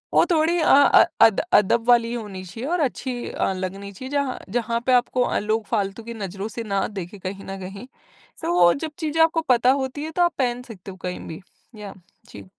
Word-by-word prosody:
वो - - +6
थोड़ी 335 +2 +2
अ - - +4
अ, 285 +4 +7 0.2
अद 220 -3 +3
अदब 225 +4 +3
वाली 235 -1 +4
होनी 205 -5 -6
चाहिए 225 - -6
और 350 0 0
अच्छी 255 -2 -3
अ, 190 - -1
लगनी 195 +2 -5
चाहिए 260 +7 -9
जहाँ 280 -3 -1 0.2
जहाँ 235 0 -1
पे 255 - +4
आपको 250 +1 +2
अ, - - 0
लोग 215 +1 -1
फालतू 205 0 -2
की 235 +1 -7
नज़रों 195 0 -5
से 230 - -2
ना 195 - +1
देखे 180 +3 -8
कहीं 195 +1 -6
न 195 0 -6
कहीं 195 +6 -8 0.5
तो 175 - -1
वो 175 -1 +5
जब 315 +2 -5
चीज़ें 320 0 0
आपको 325 0 +2
पता 250 +1 +5
होती 275 +3 -5
है 320 - -6
तो 355 - -1
आप 345 -1 +2
पहन 245 -1 0
सकते 200 -5 -10
हो 190 - -12
कहीं 180 0 -4
भी। 160 +3 -8 0.4
याह 205 -2 -8 0.4
जी। 100 -2 -11
230 Hz, 220 wpm, -23 LUFS, 195-260 Hz, 0.5 s, अ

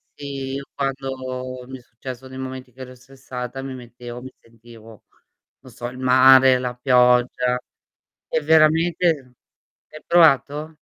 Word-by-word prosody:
sì. 135 -2 -6
Io 140 - -4
quando 130 -2 -5
mi 130 -1 -9
è - - -19
successo 125 +2 -10
nei 130 0 -10
momenti 130 -1 -7
che 130 +2 -15
ero 130 0 -9
stressata 130 0 -8
mi 135 -1 -6
mettevo 120 -1 -10
mi 130 +1 -10
sentivo, 115 -2 -17 0.6
non 130 - -15
so 120 +1 -7
il 125 - -9
mare, 130 0 +6
la 125 -1 -4
pioggia 125 0 +2 0.7
è 160 - 0
veramente 160 -3 +2 0.5
hai 155 - -13
provato? 155 -2 +3
130 Hz, 140 wpm, -21 LUFS, 125-135 Hz, 0.7 s, mare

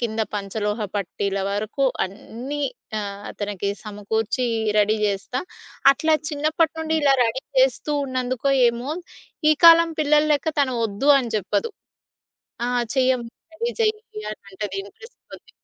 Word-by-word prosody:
కింద 225 -2 -2
పంచలోహ 210 +2 -2 0.2
పట్టీల 200 +1 -2
వరకు 215 +7 -1 0.2
అన్నీ 235 +9 -7 0.4
ఆహ్, 200 -1 -6
తనికి 200 -1 -2
సమకూర్చి 215 +4 -2 0.3
రెడీ 210 +1 +3
జేస్తా. 205 +5 -1 0.5
అట్లా 315 +3 +1
చిన్నప్పటి 310 +2 +1
నుండి 320 0 0
ఇలా 275 -1 +5
రెడీ 235 +4 -1 0.2
జేస్తూ 265 +3 +1
ఉన్నందుకో 255 +1 -1 0.2
ఏమో, 235 +4 -3 0.6
ఈ - - +8
కాలం 335 0 +8
పిల్లలెక్క 300 +1 +2
తను 260 -3 +1
ఒద్దు 220 +8 +1
అని 245 -3 -3
జెప్పదు. 215 - -1 1.0
"ఆ - - -1 0.3
చెయ్యమ్మంటది 255 +3 -1
రెడీ 470 +8 -2
జెయ్యి," 430 - -2
అని 215 - -10
అంటది 195 0 -5
ఇంటరెస్ట్ 460 - -15
కొద్ది. - - -13
245 Hz, 125 wpm, -23 LUFS, 210-295 Hz, 1.0 s, ఈ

